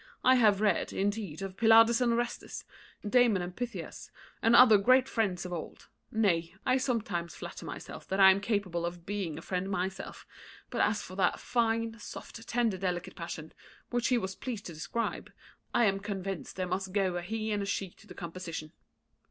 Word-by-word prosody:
I 255 - +7
have 215 -5 +4
read, 205 -4 +2
indeed, 200 -4 -2
of 190 0 -6
Pylades 225 +1 +6
and 240 -1 +3
Orestes, 240 0 -3 0.4
Damon 225 -5 +4
and 175 0 -6
Pythias, 245 -1 -6 0.3
and 230 +1 +5
other 230 -5 +8
great 255 +5 +5
friends 195 -8 -1
of 180 - -5
old; 165 - -7 0.2
nay, 170 -7 +1
I 255 +1 +3
sometimes 205 - -2
flatter - - -8
myself - - -8
that 190 - -1
I 190 -1 +9
am 195 +1 +1
capable 200 -5 -1
of 170 0 -5
being 190 -6 -3
a 160 - -8
friend 185 +1 -2
myself; 190 0 -4 0.5
but - - 0
as 210 -1 +1
for 185 - -9
that 185 -2 +2
fine, 230 -1 0
soft, 225 +2 -9
tender, 230 -5 +1
delicate 180 -1 -3
passion, 160 -2 -7 0.4
which 240 -1 +1
he 250 - +3
was 190 -4 -3
pleased 225 0 -6
to 170 - -7
describe, 230 +9 -3 0.4
I 240 - +4
am 195 -1 +2
convinced 195 -2 -5
there 185 - -2
must 185 +1 -3
go 190 -3 +1
a - - -2
he 220 +4 -3
and 205 -1 0
a 200 - -3
she 195 -2 -2
to - - -20
the - - -11
composition." 165 -3 -6
200 Hz, 185 wpm, -30 LUFS, 180-225 Hz, 0.5 s, I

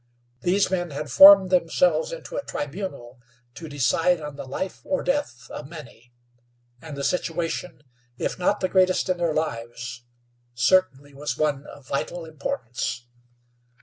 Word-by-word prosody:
These 190 +2 +2
men 175 -2 -1
had 145 -1 -6
formed 190 +5 +9
themselves 265 - +2
into - - -8
a - - -1
tribunal 145 - -6 0.3
to 160 +3 -9
decide 165 +5 +2
on 150 -2 -7
the 140 - -7
life 185 +8 -5
or 280 - -1
death 270 - -2
of 145 - -8
many, 140 -7 -12 0.7
and 155 -3 -8
the 140 - -4
situation, 170 0 -2 0.3
if - - -3
not 180 - +1
the 185 - +2
greatest 185 0 +2
in 185 - +1
their 170 -3 0
lives, 120 -4 -4 0.5
certainly 145 +1 +2
was 140 -2 -4
one 150 -2 -1
of 140 -2 -13
vital 165 +5 -3
importance. 125 -5 -4
155 Hz, 145 wpm, -24 LUFS, 135-185 Hz, 0.7 s, formed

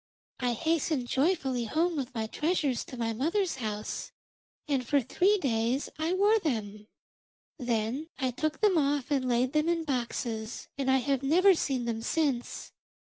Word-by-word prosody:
I 245 -1 +1
hastened 315 -1 0
joyfully 265 -4 +1
home 330 +8 +1
with 265 -3 -4
my 220 -1 -1
treasures 295 0 0
to 255 - -9
my 225 -1 -1
mother's 335 - 0
house, 215 -3 -4 0.6
and 275 -4 +1
for 285 +4 +2
three 365 - +2
days 245 - 0
I 320 +3 0
wore 410 +4 +4
them. 215 - -3 0.7
Then 245 +5 -1
I 260 -3 0
took 310 - -2
them 400 -6 +4
off 285 -1 0
and 260 -3 +1
laid 250 +3 +1
them 305 +2 +2
in 335 -1 +1
boxes, 235 -5 -3
and 275 -1 -1
I 265 - +5
have 270 0 0
never 360 +8 +5
seen 265 -7 -1
them 225 -1 -2
since. 275 -2 -1
270 Hz, 160 wpm, -29 LUFS, 240-320 Hz, 0.7 s, I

